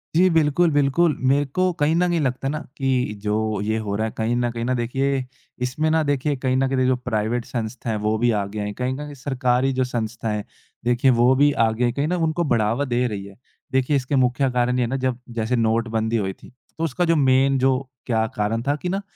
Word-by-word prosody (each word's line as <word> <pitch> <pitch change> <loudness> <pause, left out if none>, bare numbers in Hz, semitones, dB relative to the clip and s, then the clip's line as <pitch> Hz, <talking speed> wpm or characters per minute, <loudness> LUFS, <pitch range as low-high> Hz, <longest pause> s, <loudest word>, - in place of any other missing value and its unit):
जी, 185 +3 +5
बिल्कुल, 160 0 +3
बिल्कुल। 145 +2 +2
मेरे 140 +2 +3
को 185 - +3 0.2
कहीं 150 +2 +2
न 180 +1 +2
कहीं 170 -1 +1
लगता 130 -1 -1
ना 150 - -2 0.2
कि 135 -1 -1 0.3
जो 105 0 0 0.3
ये 110 +1 -1
हो 100 -1 -2
रहा 110 +2 0
है 110 - -7
कहीं 115 +2 0
न 120 0 0
कहीं 115 0 -4
ना 130 - 0
देखिए 130 +2 -1 0.4
इसमें 150 +5 -1
ना 160 0 +3
देखिए 145 +1 0
कहीं 130 0 +2
न 135 0 +2
कहीं 135 0 -1
दे 130 - +2
जो 130 - +3
प्राइवेट 115 +1 -1
संस्था 120 0 -4
हैं 110 - 0
वो 110 +1 +2
भी 120 +2 +2
आगे 100 +2 -5
हैं। 105 0 -3
कहीं 125 +3 -2
न - - -5
कहीं 150 0 -7
सरकारी 130 -1 +1
जो - - +4
संस्थाएँ 115 -3 -3
हैं 105 - -5 0.4
देखिए, 125 +2 +3
वो 120 +2 +4
भी 145 +2 +4
आगे 110 +2 -1
हैं, 120 - 0
कहें 140 +2 -1
ना 180 +2 0
उनको 165 +2 0
बढ़ावा 115 +5 +1
दे 125 +1 +2
रही 100 -4 -5
है। 100 0 -12 0.4
देखिए 130 +2 +1
इसके 135 +1 0
मुख्य 125 +2 +1
कारण 125 0 +1
ये 125 - +1
है 120 - 0
ना 135 - -1
जब 125 -1 -2 0.2
जैसे 115 +3 0
नोटबंदी 115 0 0
हुई 95 - -3
थी - - -12 0.3
तो 165 - -3
उसका 165 +3 0
जो - - +3
मेन 135 -1 +3
जो 130 0 +3 0.3
क्या 110 -3 +1
कारण 110 +2 0
था 145 - +2
कि 180 - -2
ना 195 +2 -1
125 Hz, 240 wpm, -22 LUFS, 115-140 Hz, 0.4 s, जी